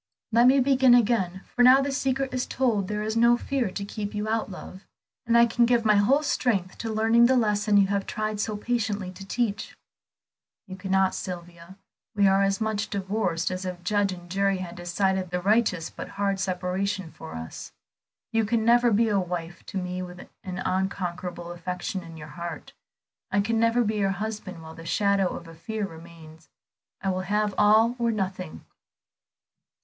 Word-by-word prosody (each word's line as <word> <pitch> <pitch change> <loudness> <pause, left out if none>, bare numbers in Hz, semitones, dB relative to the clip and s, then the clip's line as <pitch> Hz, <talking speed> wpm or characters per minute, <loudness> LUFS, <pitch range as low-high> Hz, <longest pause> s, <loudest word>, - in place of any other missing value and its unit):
Let 235 +2 +5
me 270 +2 +6
begin 260 -1 +5
again, 200 -6 +1
for 245 - +2
now 255 +2 +8
the 275 0 -1
secret 270 -1 -1
is 255 -1 -1
told 225 -7 0
there 210 +1 -2
is 220 +1 -2
no 235 +1 +5
fear 260 -3 -1
to 200 +2 -5
keep 205 0 -5
out 220 0 -1
love; 185 0 -9 0.5
and 235 0 +4
I 235 - +7
can 235 0 +2
give 235 -2 +2
my 215 - +5
whole 270 +9 +3
strength 200 -10 0
to 225 - -3
learning 225 +2 +4
the 260 - +3
lesson 210 -2 +2
you 200 - +6
have 200 -1 -1
tried 215 -1 -3
so 215 0 -2
patiently 210 -4 -2
to 190 +1 -11
teach." 210 +1 -2 0.9
"You 185 - -8
cannot, 190 0 +1
Sylvia. 175 0 -8 0.4
We 200 -1 +4
are 195 0 +4
as 195 0 +1
much 220 -1 -1
divorced 190 -4 -1
as 185 +1 -4
if 180 -1 -6
judge 205 +1 +1
and 175 -1 -9
jury 195 +2 +1
had 180 -2 -6
decided 185 +1 -1
the 180 +1 -1
righteous 200 -3 +1
but - - -7
hard 200 -1 0
separation 185 0 -2
for 80 - -10
us. 80 0 -8 0.6
You 225 0 +2
can 220 +1 0
never 240 +1 +5
be 225 +1 +3
a 205 -2 +2
wife 175 -1 -5
to - - -5
me 180 0 -3
with 180 -1 -8 0.3
an 185 -1 -5
unconquerable 180 -2 -3
affection 180 +3 -4
in 165 -1 -11
your 150 0 -9
heart; 170 +2 -7 0.6
I 200 - +1
can 225 +3 +1
never 230 +1 +3
be 215 -1 -1
your 195 -1 +1
husband 205 -5 -5
while 160 0 -10
the 165 - -11
shadow 200 +1 +2
of 170 - -9
a 165 - -11
fear 215 +6 -4
remains. 165 -2 -13 0.5
I 195 - +1
will 185 0 -2
have 210 +2 0
all 220 +3 +4
or 235 -1 +1
nothing." 190 - -4
200 Hz, 185 wpm, -26 LUFS, 180-225 Hz, 0.9 s, now